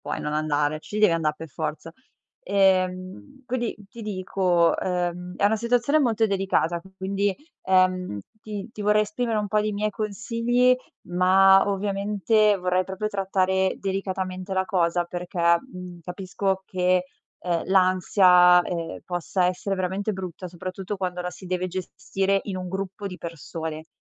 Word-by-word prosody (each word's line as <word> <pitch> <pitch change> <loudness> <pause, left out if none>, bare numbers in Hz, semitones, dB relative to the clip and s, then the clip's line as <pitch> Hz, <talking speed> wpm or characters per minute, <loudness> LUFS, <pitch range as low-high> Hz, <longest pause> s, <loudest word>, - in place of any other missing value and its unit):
puoi - - -4
non 150 - -3
andare, 150 0 0
ci 210 +6 -6
devi 210 -5 +5
anda' 160 -2 +1
per 155 +2 -9
forza. 155 +2 -5 0.5
Ehm, 185 - 0
quindi 240 -2 -2
ti 230 +2 -10
dico, 185 -4 +1
ehm, 180 0 -2
è - - 0
una 210 +2 +4
situazione 245 +6 +2
molto 225 -4 +2
delicata, 190 -4 0
che 190 - -17
quindi, 195 +1 0 0.3
ehm, 185 - +2 0.2
ti 210 -1 -6
ti 210 - -7
vorrei 210 +1 +4
esprimere 235 -2 -1
un 210 - -1
po' 210 +1 +1
di 210 0 -1
miei 210 +1 -1
consigli, 230 +4 +1 0.3
ma 190 +2 +5
ovviamente 205 +1 +2
vorrei 180 0 +1
proprio 190 +3 -4
trattare 190 -1 +1
delicatamente 190 -1 -3
la 190 0 +1
cosa 175 -3 +1
perché, 175 +1 -6 0.2
mhmm, 180 -8 -10
capisco 190 +2 -2
che, 180 -1 +1 0.3
uhm, 170 -2 -1
l'ansia, 180 -1 +5
ehm, 170 -2 -4
possa 180 +1 0
essere 185 +2 -1
veramente 190 +3 -2
brutta, 185 -1 -6
soprattutto 185 +3 -6
quando 180 -2 -3
la 180 - -3
si 185 - -11
deve 180 0 -1
gestire 190 +2 -1
in 195 -3 -4
un 185 0 -5
gruppo 195 +2 -4
di 180 -1 -9
persone. 160 -1 -6
185 Hz, 150 wpm, -25 LUFS, 180-200 Hz, 0.5 s, devi